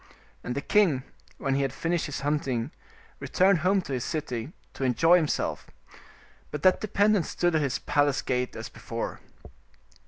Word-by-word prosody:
And 125 Hz, -, -3 dB
the 140 Hz, -, -1 dB
king, 165 Hz, -9 st, +3 dB, 0.3 s
when 135 Hz, -, -1 dB
he 140 Hz, -, +1 dB
had 135 Hz, -2 st, 0 dB
finished 170 Hz, +3 st, -1 dB
his 145 Hz, -, -5 dB
hunting, 140 Hz, -3 st, -1 dB, 0.5 s
returned 190 Hz, -1 st, +3 dB
home 185 Hz, +3 st, +2 dB
to 140 Hz, -, -5 dB
his 125 Hz, -2 st, -1 dB
city, 140 Hz, -4 st, -3 dB, 0.2 s
to -, -, -5 dB
enjoy 165 Hz, +7 st, +5 dB
himself, 155 Hz, -4 st, -1 dB, 0.8 s
but 150 Hz, -, -6 dB
that 185 Hz, -1 st, +5 dB
dependent 205 Hz, -3 st, +2 dB
stood 175 Hz, -1 st, 0 dB
at 155 Hz, -, +2 dB
his 140 Hz, -3 st, 0 dB
palace 145 Hz, -2 st, +1 dB
gate 125 Hz, -1 st, -1 dB
as -, -, -6 dB
before. -, -, -5 dB
150 Hz, 160 wpm, -27 LUFS, 135-175 Hz, 0.8 s, enjoy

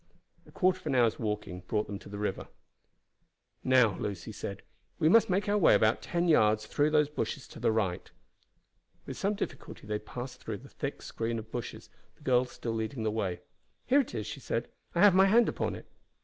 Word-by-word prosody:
A -, -, -15 dB
quarter 185 Hz, -1 st, +2 dB
of 180 Hz, -, -9 dB
an 140 Hz, -, +1 dB
hour's 120 Hz, -3 st, +3 dB
walking 105 Hz, -5 st, -3 dB
brought 105 Hz, -1 st, 0 dB
them 100 Hz, -1 st, -6 dB
to -, -, -13 dB
the 100 Hz, -, -6 dB
river. 105 Hz, -2 st, -3 dB, 1.2 s
"Now," 125 Hz, -6 st, +4 dB
Lucy 100 Hz, 0 st, -4 dB
said, 100 Hz, -1 st, -6 dB, 0.3 s
"we 155 Hz, -, +2 dB
must 225 Hz, +6 st, +6 dB
make 195 Hz, +3 st, +1 dB
our 205 Hz, +1 st, +2 dB
way 165 Hz, -, +6 dB
about 110 Hz, +2 st, +3 dB
ten 175 Hz, 0 st, -1 dB
yards 110 Hz, -8 st, +4 dB
through 145 Hz, +7 st, +1 dB
these 150 Hz, -1 st, +3 dB
bushes 145 Hz, -1 st, -4 dB
to -, -, -11 dB
the -, -, +2 dB
right." 100 Hz, -5 st, -1 dB, 1.0 s
With -, -, -6 dB
some 205 Hz, +2 st, 0 dB
difficulty -, -, -6 dB
they 105 Hz, 0 st, -2 dB
passed 125 Hz, +4 st, -8 dB
through 110 Hz, -2 st, -4 dB
the 135 Hz, +5 st, -14 dB
thick 140 Hz, -1 st, -5 dB
screen 115 Hz, 0 st, -3 dB
of 110 Hz, 0 st, -8 dB
bushes, 120 Hz, -1 st, -6 dB, 0.2 s
the -, -, -22 dB
girl 125 Hz, 0 st, +3 dB
still 120 Hz, -2 st, -5 dB
leading 110 Hz, +2 st, -3 dB
the 110 Hz, -, 0 dB
way. 100 Hz, -5 st, -2 dB, 0.4 s
"Here 270 Hz, +3 st, +4 dB
it 245 Hz, -, -7 dB
is," 105 Hz, -2 st, -3 dB
she -, -, -6 dB
said; -, -, -3 dB, 0.3 s
"I 170 Hz, -, +3 dB
have 205 Hz, -2 st, +8 dB
my 190 Hz, +1 st, +6 dB
hand 230 Hz, +4 st, +5 dB
upon -, -, -2 dB
it." -, -, -10 dB
120 Hz, 205 wpm, -30 LUFS, 105-160 Hz, 1.2 s, have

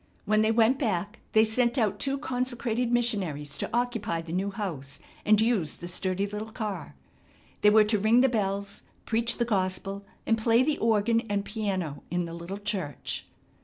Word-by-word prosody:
When 215 Hz, 0 st, +3 dB
they 220 Hz, 0 st, +3 dB
went 230 Hz, +4 st, +4 dB
back 205 Hz, -5 st, -1 dB
they 220 Hz, -, +6 dB
sent 235 Hz, +3 st, +1 dB
out 215 Hz, -5 st, +1 dB
two 275 Hz, 0 st, +1 dB
consecrated 245 Hz, -3 st, -1 dB
missionaries 185 Hz, -, 0 dB
to -, -, -2 dB
occupy 230 Hz, -8 st, -1 dB
the 165 Hz, 0 st, -7 dB
new 190 Hz, +3 st, 0 dB
house 175 Hz, -10 st, -5 dB, 0.3 s
and 215 Hz, 0 st, +5 dB
use 220 Hz, -9 st, +1 dB
the 175 Hz, -, -7 dB
sturdy 185 Hz, +2 st, -1 dB
little 210 Hz, +2 st, -5 dB
car. 205 Hz, -, -5 dB, 0.7 s
They 210 Hz, -, +7 dB
were 215 Hz, +1 st, +7 dB
to 210 Hz, 0 st, +1 dB
ring 220 Hz, +4 st, +5 dB
the 265 Hz, -, +5 dB
bells, 200 Hz, -4 st, -2 dB, 0.2 s
preach 235 Hz, +1 st, +1 dB
the 235 Hz, -, +1 dB
gospel 195 Hz, -1 st, -1 dB, 0.2 s
and 225 Hz, 0 st, +2 dB
play 230 Hz, +2 st, +4 dB
the 300 Hz, +2 st, 0 dB
organ 225 Hz, +1 st, +3 dB
and 200 Hz, 0 st, 0 dB
piano 190 Hz, -9 st, -3 dB
in 175 Hz, 0 st, -1 dB
the 165 Hz, -, -7 dB
little 170 Hz, +3 st, -6 dB
church. 200 Hz, -, -4 dB
210 Hz, 175 wpm, -28 LUFS, 190-230 Hz, 0.7 s, They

